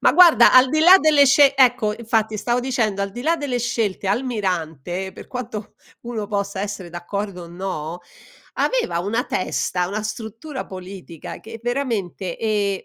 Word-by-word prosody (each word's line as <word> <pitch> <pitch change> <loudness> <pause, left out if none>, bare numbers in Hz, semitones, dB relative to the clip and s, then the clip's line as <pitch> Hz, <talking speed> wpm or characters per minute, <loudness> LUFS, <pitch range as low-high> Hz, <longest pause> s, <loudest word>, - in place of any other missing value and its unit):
Ma - - +4
guarda, 335 -7 +7
al 255 0 +7
di 310 +4 +1
là 355 +4 +9
delle 300 -2 +5
sce 275 0 +5
ecco, 245 -5 +3
infatti 220 -2 0
stavo 240 +3 0
dicendo, 230 -6 -1
al 200 0 -2
di 240 +5 -7
là 330 +4 +2
delle 285 -5 -2
scelte, 225 -5 -2
Almirante, 190 - -2
per - - -12
quanto 230 -4 -6 0.3
uno 230 -3 -4
possa 200 -1 -3
essere 200 -3 -5
d'accordo 180 +2 -5
o - - -11
no, 175 -2 -5 0.5
aveva - - 0
una 215 +8 -1
testa, 180 -1 -1
una 210 +3 -3
struttura 225 +6 -6
politica 185 -3 -9
che 225 +1 -10
veramente 225 -8 -3
e 205 -3 -1
215 Hz, 160 wpm, -21 LUFS, 190-250 Hz, 0.5 s, là